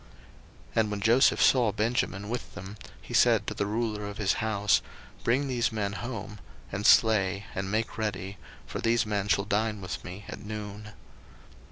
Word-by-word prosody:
01:043:016 - - -23
And 110 -2 +3
when 105 -1 -3
Joseph 120 +5 +4
saw 120 -5 +5
Benjamin 105 -2 -1
with 120 +1 -5
them, 100 0 -8 0.2
he - - -10
said - - +4
to - - -3
the 100 - -2
ruler 105 -1 -2
of 105 - -7
his 100 -3 +2
house, 105 -2 +2 0.4
Bring 130 +4 +2
these 125 -3 0
men 100 -2 -2
home, 110 -1 -6 0.3
and 100 +1 0
slay, 100 -3 +4
and 95 0 -3
make 110 +2 -2
ready; 100 -2 -3 0.3
for - - -5
these 115 0 +2
men 105 -2 -1
shall 100 +1 +2
dine 105 +1 0
with 90 -1 -5
me 95 +2 -8
at 105 - -8
noon. 105 0 -7
105 Hz, 175 wpm, -28 LUFS, 100-110 Hz, 0.4 s, saw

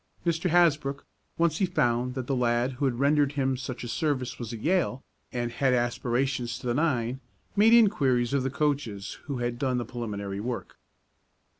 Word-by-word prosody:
Mr. 170 +1 +1
Hasbrook, 150 -5 +2 0.3
once 165 -1 +2
he 195 - +3
found 125 -2 0
that 130 -2 -3
the 135 - -1
lad 120 +1 +1
who 135 +2 -2
had 125 -3 0
rendered 145 +1 +3
him 135 -2 +1
such 125 -1 -6
a - - -4
service 130 0 -1
was 120 -2 -5
at 115 - -6
Yale, 155 - 0 0.3
and 120 -1 -2
had 130 +1 +2
aspirations 120 0 -1
to 125 - -11
the 120 - +1
nine, 130 -4 0 0.4
made 210 +2 +6
inquiries 140 - +4
of 140 - +2
the 130 - -1
coaches 135 -9 -2
who 140 -4 -3
had 120 0 -2
done 130 -2 0
the 120 - -2
preliminary 100 -5 -5
work. 120 +3 -5
130 Hz, 180 wpm, -27 LUFS, 120-145 Hz, 0.4 s, made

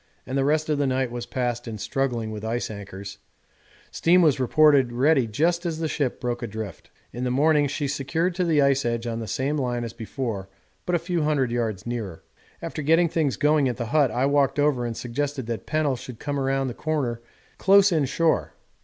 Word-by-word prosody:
and 130 - -4
the 135 - +2
rest 155 +2 +1
of 150 -2 0
the 140 - +2
night 130 -1 0
was 120 0 -5
passed 120 -1 -2
in 110 -2 -5
struggling 120 -2 -2
with 105 -1 -6
ice 115 +1 -2
anchors; 100 -1 -8 0.7
steam 175 +2 +4
was 150 -5 +3
reported 140 -1 +4
ready 130 +1 +3
just 170 - +1
as 170 -3 -2
the 160 0 -1
ship 145 -5 -2
broke 120 0 -3
adrift. 110 -6 -6 0.2
In 120 - -4
the 125 - 0
morning 145 +3 +3
she 145 +1 -2
secured 160 +6 -1
to 180 +1 -1
the 155 -4 +3
ice 140 0 +3
edge 115 0 -1
on 115 -1 -3
the 110 - -5
same 135 +8 -1
line 120 -3 -1
as 115 -1 -5
before 110 -4 -5 0.4
but 180 - +2
a - - +4
few 170 0 -2
hundred 145 -5 +1
yards 110 -5 -2
nearer. 115 -8 -5 0.4
After - - -4
getting 165 +3 +3
things 155 -5 0
going 150 -2 +3
at 120 - -4
the 120 - -3
hut, 145 -4 +4
I 125 +4 0
walked 140 -1 +2
over 145 -5 +2
and 115 - -5
suggested 135 +2 -3
that 115 -1 -5
Pennell 155 -3 +1
should 120 -1 -9
come 145 +3 -3
round 135 0 0
the 125 - -4
corner 130 -6 -2 0.4
close 200 +1 +6
in 155 -4 +2
shore. 160 +5 0
135 Hz, 210 wpm, -25 LUFS, 120-150 Hz, 0.7 s, close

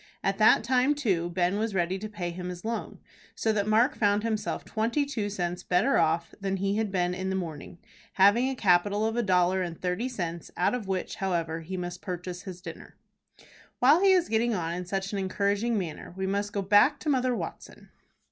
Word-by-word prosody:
At 195 +1 0
that 215 0 +6
time, 255 +4 +2
too, 190 -12 0
Ben 180 +3 0
was 220 -2 -2
ready 180 +1 0
to 215 +2 -6
pay 180 -5 -4
him 180 +1 -6
his 180 +2 -8
loan, 230 0 -4 0.4
so 220 - 0
that 205 -1 0
Mark 230 +7 +3
found 205 -1 +2
himself 215 -2 -2
twenty 235 +6 0
two 225 -7 -3
cents 180 -3 -3
better 185 +11 +2
off 165 +1 +1
than 195 0 -1
he 195 +2 0
had 220 -2 -1
been 180 -1 0
in 185 +1 -3
the 190 - -1
morning, 165 -3 -6 0.4
having 205 +7 +4
a 265 - -3
capital 205 0 +2
of 225 0 -1
a 240 - +2
dollar 185 -2 +2
and 170 -2 -4
thirty 185 +8 -2
cents, 170 -8 -5
out 180 - +2
of 240 -5 -3
which, 190 -1 -3
however, 170 -4 -1
he 185 +4 -6
must 175 -1 -5
purchase 180 -1 -5
his 185 -2 -9
dinner. 165 -3 -10 0.8
While 290 +8 +5
he 390 -1 +6
is 360 -2 +3
getting 225 +1 +1
on 165 -2 -2
in 180 +1 -4
such 195 +1 -2
an 200 - -1
encouraging 200 +4 0
manner 175 -2 -5
we 190 - -2
must 200 +2 -1
go 200 -1 -2
back 205 +9 +4
to 305 - -2
Mother 255 -3 +2
Watson. - - -8
195 Hz, 210 wpm, -28 LUFS, 180-220 Hz, 0.8 s, that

